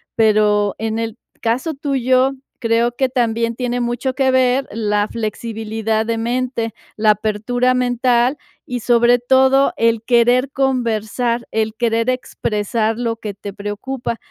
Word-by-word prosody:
pero 210 -2 +3
en 225 0 -2
el 225 0 -4 0.2
caso 255 +8 0
tuyo, 265 -2 +1 0.3
creo 235 0 +1
que 265 +1 +1
también 230 -2 0
tiene 245 -1 -1
mucho 245 +2 -1
que 265 -1 +2
ver 260 +1 +2
la 210 -1 0
flexibilidad 220 0 -2
de 230 0 -1
mente, 235 -1 -2 0.2
la 215 0 +2
apertura 230 +5 0
mental, 250 +1 +2 0.3
y 250 0 -4
sobre 240 +1 +4
todo 265 +2 +4
el 230 -1 +2
querer 245 +2 +3
conversar, 240 -3 -1
el 220 0 -1
querer 230 0 0
expresar 225 -3 -1
lo 230 -1 -2
que 215 -2 -6
te 200 +1 -8
preocupa. 220 +5 -4
235 Hz, 135 wpm, -19 LUFS, 220-255 Hz, 0.3 s, sobre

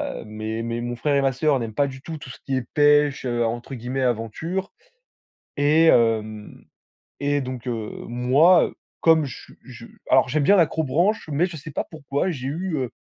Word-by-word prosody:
heu, - - -5
mes 110 +1 -5
mes 115 0 -3
mon 120 0 -3
frère 145 +3 0
et - - +4
ma 135 -1 +2
sœur 145 +1 +1
n'aiment 115 -3 -5
pas 140 +3 +1
du 130 -1 -9
tout 160 +2 -6
tout 145 - -11
ce - - -10
qui 135 - -1
est 130 - -2
pêche, 145 -2 +4
heu, 120 -1 0
entre 120 +3 -4
guillemets 125 +2 -4
aventure. 130 - -2 0.9
Et 150 +3 +4
hem 110 -6 +1 0.6
et 145 0 +1
donc, 130 -2 -6
heu, 115 -3 -3 0.2
moi, 135 +9 +4
heu, - - -8 0.3
comme 160 -1 +5
je 135 - -7
su - - -19
je, 125 -3 -11 0.2
alors 130 - +5
j'aime 150 +2 +1
bien 200 +8 +5
l'accrobranche, 165 +4 +1
mais 150 +5 +2
je 175 -3 -7
sais 155 +2 -9
pas - - -3
pourquoi 140 +2 -2
j'ai 130 -5 -5
eu, 170 +4 -3
heu, 130 -3 -3
135 Hz, 200 wpm, -23 LUFS, 120-155 Hz, 0.9 s, comme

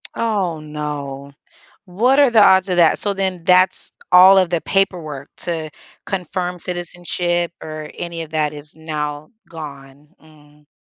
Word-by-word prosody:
Oh, 195 -8 -1
no. 145 -2 -6 0.5
What 225 +9 +1
are 285 -3 +5
the 225 -3 +5
odds 190 -1 +5
of 180 - 0
that, 170 -2 +4
so 205 - +1
then, 190 -3 -2
that's 185 +1 +3 0.2
all 185 +2 +8
of 185 -3 +2
the 170 -2 0
paperwork 160 -9 -2
to 160 -3 -3 0.3
confirm 180 -1 -4
citizenship, 175 0 -2
or 155 -1 -7
any 170 -1 -5
of 160 - -10
that 155 -2 -1
is 150 0 -8
now 150 -2 -5 0.2
gone? 145 -3 -11
Mm. 150 -1 -21
170 Hz, 145 wpm, -19 LUFS, 150-185 Hz, 0.5 s, all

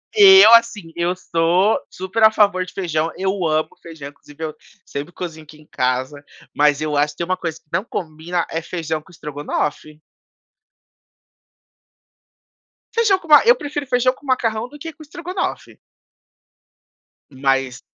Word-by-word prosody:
Eu, 385 - +9
assim, 230 -7 +3
eu 175 +1 -1
sou 180 +4 +1
super 190 +4 -4
a 220 - +8
favor 200 -4 +2
de 180 - -11
feijão, 165 -3 -2
eu 190 -2 -1
amo 155 0 0
feijão, 160 -4 -9
inclusive 145 +2 -13
eu 155 -1 -4 0.3
sempre 145 +4 -6
cozinho 165 -4 -7
aqui 155 0 -16
em 155 - -19
casa, 130 +2 -2 0.3
mas 145 0 +3
eu 155 -1 -2
acho 145 +1 +1
que - - -31
tem 170 - -2
uma 185 +1 0
coisa 165 -2 -5
que - - -43
não 190 - 0
combina 170 -3 -4
é 165 - -2
feijão 160 -2 -4
com 175 - -21
estrogonofe. 150 0 -4 2.9
Feijão 440 -4 +3
com 360 - -15
ma 300 -1 +7
eu 480 +1 +6
prefiro 290 - -5
feijão 250 +1 +2
com 285 - -20
macarrão 235 -3 -1
do 295 - -13
que 325 +2 -8
com 295 - -18
estrogonofe. 350 +4 -5 1.5
Mas 135 -2 -1
170 Hz, 155 wpm, -20 LUFS, 155-230 Hz, 2.9 s, Eu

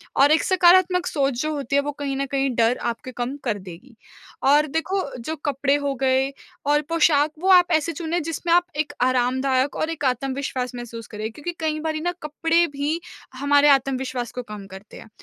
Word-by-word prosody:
और 285 +2 +5
एक 320 - +4
सकारात्मक 365 0 +4
सोच 275 -4 0
जो 310 - -1
होती 280 -2 -2
है, 280 - +4
वो 290 +1 -3
कहीं 280 -1 -4
न 275 - -1
कहीं 275 0 0
डर 235 +1 +2
आपके 255 +2 -9
कम 245 +3 -4
कर 220 -5 -1
देगी 190 +7 -12 0.5
और 295 +3 +4
देखो, 345 +7 -1 0.2
जो 315 +7 -4
कपड़े 280 -1 0
हो 285 -1 -1
गए 265 +1 +1 0.3
और 295 +1 +3
पोशाक, 310 -2 +3
वो 375 +3 0
आप 360 -1 +6
ऐसे 320 +1 +2
चुनें 335 +2 -2
जिसमें 330 +1 -1
आप 350 0 +4
एक 305 0 -2
आरामदायक 255 +2 +1
और 315 - -1
एक 310 -4 -4
आत्मविश्वास 260 0 -2
महसूस 235 -2 -8
करें 215 +1 -5
क्योंकि 300 +8 -6
कई 310 -1 -1
बारी 315 0 -2
ना 350 +2 0
कपड़े 325 +3 +2
भी 290 +4 -2 0.4
हमारे 285 +2 +3
आत्मविश्वास 260 -2 -4
को 250 - -5
कम 210 -3 -9
करते 190 +1 -12
हैं। - - -13
280 Hz, 195 wpm, -23 LUFS, 255-315 Hz, 0.5 s, आप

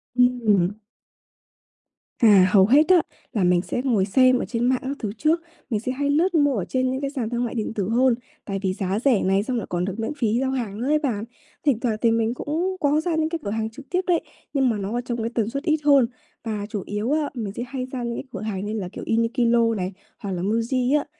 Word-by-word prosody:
Ừm. 225 -7 +3 1.5
À, 200 -6 +6
hầu 190 -1 +6
hết 290 - +5
á, 365 -2 +7 0.3
là 205 -5 +1
mình 180 0 +3
sẽ 245 - -3
ngồi 220 -8 +2
xem 255 +4 +4
ở - - -2
trên 235 +4 -1
mạng 255 0 +2
các 270 +2 -3
thứ 210 - -3
trước, 320 +5 +2 0.3
mình 220 -4 0
sẽ 245 +4 -3
hay 280 +2 -1
lướt 340 +5 +2
mua 285 -3 +3
ở 185 - -2
trên 255 0 0
những 260 +1 -3
cái 275 - -1
sàn 255 -6 -3
thương 240 +1 -1
mại 235 - -5
điện 225 -1 -2
tử 200 -3 -2
hơn, 245 +1 +3 0.3
tại 195 -1 -3
vì 190 -1 +1
giá 190 +2 -2
rẻ 245 -4 +2
này 195 +2 +2
xong 250 +1 -2
lại 225 - -4
còn 175 0 -1
được 195 +3 -5
miễn 225 +6 -2
phí 230 -3 +1
giao 265 0 0
hàng 230 -6 -3
nữa 250 - -2
ấy 305 +1 +3
bạn. 240 -9 -2 0.4
Thỉnh 265 -6 +3
thoảng 235 -3 0
thì 230 - +4
mình 225 0 +1
cũng 330 +8 -2
có 295 0 +2
ra 330 0 -1
những 315 0 +1
cái 335 0 -3
cửa - - -3
hàng 220 0 -2
trực 270 +5 -13
tiếp 365 +1 +1
đấy, 345 -2 +3 0.3
nhưng 270 -3 +3
mà 225 - 0
nó 200 +2 -4
ở - - -1
trong 240 -1 -4
một 225 - -3
cái 230 - -2
tần 225 -2 +1
suất 275 +4 -4
ít 315 -2 +2
hơn 280 -4 +5 0.4
và 215 -3 -3
chủ 205 -5 -4
yếu 210 +6 -2
á, 305 -1 +1
mình 220 -6 -4
sẽ 235 - -4
hay 260 -1 -4
ra 255 -2 -4
những 235 0 -3
cái - - -5
cửa - - -6
hàng 205 -2 -3
như 210 - -3
là, 195 -5 -3
kiểu, - - -7
Uniqlo 230 0 +2
này 185 -1 -3 0.3
hoặc 200 - -5
là 175 - -3
Muji 240 +7 +1
á. - - -5
235 Hz, 265 wpm, -23 LUFS, 210-270 Hz, 1.5 s, á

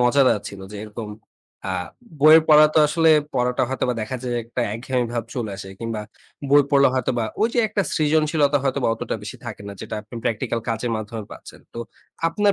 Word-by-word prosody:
মজাদার 125 -2 +4
ছিল 100 - -10
যে, - - -7
এরকম 105 0 -7 0.6
আ - - -1 0.5
বইয়ের 155 +2 +8
পড়া 155 0 +8
তো - - +5
আসলে 165 +1 +3 0.2
পড়াটা 125 -1 +1
হয়তোবা 130 -1 -1
দেখা 110 +4 -3
যায় 120 -1 -2
একটা 120 +2 -4
একঘেমি 125 +2 -1
ভাব 120 -2 -2
চলে 115 -5 -3
আসে 95 0 -8
কিংবা 115 -2 -3 0.5
বই 145 +1 +7
পড়লে 140 -1 +5
হয়তো 130 -2 0
বা 115 - 0 0.2
ওই 220 - +4
যে, - - +1
একটা 210 -1 0
সৃজনশীলতা 155 -1 +2
হয়তোবা 135 -2 0
অতটা 115 - -4
বেশি 105 - -7
থাকে 110 -3 -7
না - - -6
যেটা - - -6
আপনি 110 +3 -14
প্র্যাকটিক্যাল 115 +1 -1
কাজের 115 +1 -1
মাধ্যমে 110 0 -6
পাচ্ছেন। - - -12
তো - - -6 0.5
আপনার 205 +4 +2
125 Hz, 190 wpm, -22 LUFS, 115-145 Hz, 0.6 s, বইয়ের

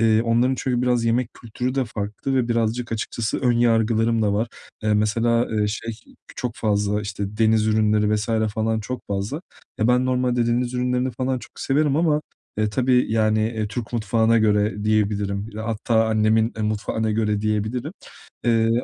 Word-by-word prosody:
Eee, 110 -1 +4
onların 120 +3 +2
çünkü 125 -2 0
biraz 125 -2 +1
yemek 115 +1 +1
kültürü 125 +2 -4
de 135 -2 +1
farklı 110 +5 -4
ve 125 -2 +1
birazcık 115 +1 -1
açıkçası 115 0 -2
ön 125 -2 +2
yargılarım 115 -1 +2
da 105 -1 +2
var. 110 +3 0 0.3
E, 105 0 +2
mesela, 115 +3 +2
eee, 105 -1 +1
şey 110 +2 -4 0.4
çok 125 -3 -3
fazla 105 -1 0
işte 100 0 -5
deniz 110 -1 +3
ürünleri 105 -1 +2
vs. 105 +2 -4 0.3
falan 110 0 0
çok 125 +4 -5
fazla. 100 +10 -3 0.4
Ya, 110 - +3
ben 125 +1 +3
normalde 125 -2 +1
deniz 120 +1 0
ürünlerini 125 +1 0
falan 130 +2 -2
çok - - -13
severim 145 +1 +1
ama, 155 -2 +2 0.4
e, 110 0 +2
tabii, 125 0 +2
yani, 110 -1 +2
eee, 110 -1 -2
Türk 115 +1 -5
mutfağına 115 0 +2
göre 105 -1 +1
diyebilirim. 105 -1 0
Hatta 110 0 0
annemin, 110 +1 +2
eee, 110 - -3
mutfağına 110 +1 -1
göre 105 -1 0
diyebilirim. 110 +3 -2 0.5
Eee, 115 -1 +3
110 Hz, 165 wpm, -23 LUFS, 105-120 Hz, 0.5 s, Eee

